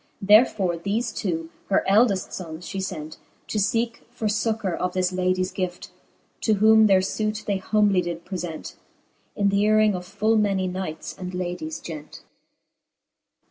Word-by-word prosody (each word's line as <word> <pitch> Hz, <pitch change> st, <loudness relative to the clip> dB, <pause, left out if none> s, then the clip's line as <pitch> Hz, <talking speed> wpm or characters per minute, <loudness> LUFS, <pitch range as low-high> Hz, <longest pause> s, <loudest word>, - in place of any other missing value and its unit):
Therefore 205 Hz, -3 st, +4 dB
theie 215 Hz, +6 st, -2 dB
two, 165 Hz, -4 st, -3 dB, 0.2 s
her 195 Hz, -, +2 dB
eldeft 200 Hz, -1 st, +3 dB
fonnss, 170 Hz, -1 st, -7 dB
fhe 195 Hz, -, -3 dB
fent, 155 Hz, -3 st, -7 dB, 0.3 s
To 215 Hz, -, -1 dB
feeke 230 Hz, +3 st, 0 dB
for 240 Hz, -2 st, -6 dB
fuccour 215 Hz, -3 st, 0 dB
of 180 Hz, 0 st, -2 dB
this 185 Hz, 0 st, 0 dB
ladies 185 Hz, 0 st, 0 dB
gleft: 180 Hz, -2 st, -4 dB, 0.5 s
To 220 Hz, -, +2 dB
whom 220 Hz, +1 st, +6 dB
their 190 Hz, -2 st, +5 dB
fute 215 Hz, +2 st, -2 dB
they 200 Hz, -2 st, 0 dB
humbly 200 Hz, -1 st, +2 dB
did 170 Hz, -1 st, -5 dB
prelent, 175 Hz, -4 st, -6 dB, 0.6 s
In 200 Hz, -1 st, +2 dB
th'hcaring 210 Hz, +1 st, +4 dB
of 180 Hz, -1 st, -4 dB
full 215 Hz, +3 st, +1 dB
many 195 Hz, -3 st, +1 dB
knights 180 Hz, -4 st, -5 dB
and 180 Hz, 0 st, -6 dB
ladies 175 Hz, -3 st, -4 dB
gent. 155 Hz, -2 st, -9 dB
190 Hz, 145 wpm, -24 LUFS, 180-215 Hz, 0.6 s, whom